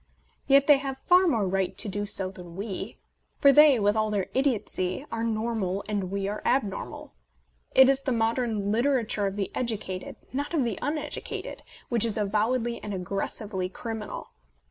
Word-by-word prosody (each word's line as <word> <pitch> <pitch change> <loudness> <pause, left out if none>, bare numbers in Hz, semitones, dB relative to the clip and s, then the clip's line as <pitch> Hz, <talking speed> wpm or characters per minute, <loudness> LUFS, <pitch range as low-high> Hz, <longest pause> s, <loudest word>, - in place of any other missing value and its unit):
Yet 275 0 +6
they 290 -2 +6
have 270 -1 -4
far 365 +1 +5
more 225 - +1
right 190 0 -1
to 225 - +3
do 205 +1 -3
so 190 -2 0
than 175 -3 -11
we; 200 0 -5 0.4
for 280 - +6
they, 290 -2 +7
with 205 0 +2
all 215 0 +1
their 205 -3 -2
idiotcy, 235 -4 0
are 230 0 -2
normal 220 -4 -1
and 200 -3 -2
we 195 0 -2
are 210 +1 -4
abnormal. 210 - -2 0.6
It 265 - +8
is 270 0 +3
the 270 - -2
modern 225 -3 0
litera 245 +2 +2
ture 205 -1 0
of 195 - -4
the 200 -2 -3
educated, 205 -6 -3 0.2
not 285 +5 -2
of 290 - +2
the 230 -5 -2
uneducated, 295 +2 -4 0.3
which 235 -3 +3
is 225 -3 +1
avowedly 225 +4 0
and 205 -2 -4
aggressively 190 +1 -3
criminal. 220 +1 -6
220 Hz, 170 wpm, -27 LUFS, 200-255 Hz, 0.6 s, It